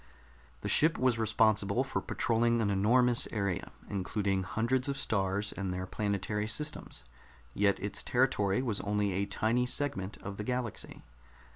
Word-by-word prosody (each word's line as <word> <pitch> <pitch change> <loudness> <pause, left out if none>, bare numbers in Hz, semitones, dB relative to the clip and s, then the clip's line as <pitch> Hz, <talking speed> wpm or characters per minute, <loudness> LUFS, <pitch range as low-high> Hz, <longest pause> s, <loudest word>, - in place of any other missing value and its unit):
The - - -4
ship 160 +2 +4
was 125 -3 +2
responsible 110 0 +2
for - - -3
patrolling 115 -2 +1
an 105 -3 +1
enormous 120 +5 +3
area, 100 -5 -2 0.2
including 100 0 -1
hundreds 120 +8 0
of 140 - -2
stars 100 -3 0
and 95 -2 -3
their 90 0 -3
planetary 105 +1 -2
systems 150 - -4 0.5
yet 100 +3 +2
its 100 +1 -3
territory 125 -3 +1
was 110 -5 -1
only 105 -1 0
a 100 +2 -1
tiny 115 +4 +1
segment 105 -9 -2
of 100 0 -6
the 105 - -4
galaxy. 125 -1 -4
105 Hz, 145 wpm, -31 LUFS, 100-125 Hz, 0.5 s, ship